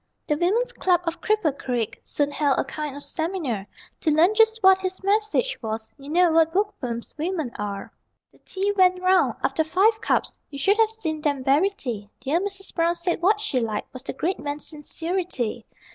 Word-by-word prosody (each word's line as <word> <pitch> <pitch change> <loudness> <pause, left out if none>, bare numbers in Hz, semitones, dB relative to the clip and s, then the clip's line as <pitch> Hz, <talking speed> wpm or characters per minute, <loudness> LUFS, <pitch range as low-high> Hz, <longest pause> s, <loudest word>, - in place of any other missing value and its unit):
The 300 - +1
women's 400 +10 +1
club 360 -2 +2
of 335 -1 -4
Cripple 425 -10 +1
Creek 245 -6 -3
Soon 290 -1 -1
held 285 -2 +1
a - - +2
kind 295 0 -5
of 285 - -6
seminar 315 - -2 0.3
To - - 0
learn 325 +6 +5
just 445 0 +3
what 380 0 +6
his 375 0 -3
message 430 +5 +1
was 220 -1 -4
You 280 0 -12
know 350 +2 +4
what 325 0 +4
bookworms 265 - -2
women 320 -5 -2
are. 200 -1 -5 0.4
The - - -25
tea 395 +1 -2
went 370 -1 +4
round. 370 0 +3
After 320 - +1
five 420 +7 +2
cups - - 0
(You 280 - -8
should 395 +9 +3
have 445 -1 +4
seen 335 -9 -3
them 285 -3 -1
bury 290 +9 +4
tea) 235 - -6
Dear 280 +6 +1
Mrs. 390 0 -5
Brown 335 0 +2
said 345 0 -1
what 410 +4 +3
she 420 -12 0
liked 220 -3 -3
Was 255 - -7
the 270 - -5
great 345 +8 -2
man's 290 0 -4
sincerity. 305 - -3
330 Hz, 190 wpm, -24 LUFS, 280-385 Hz, 0.4 s, what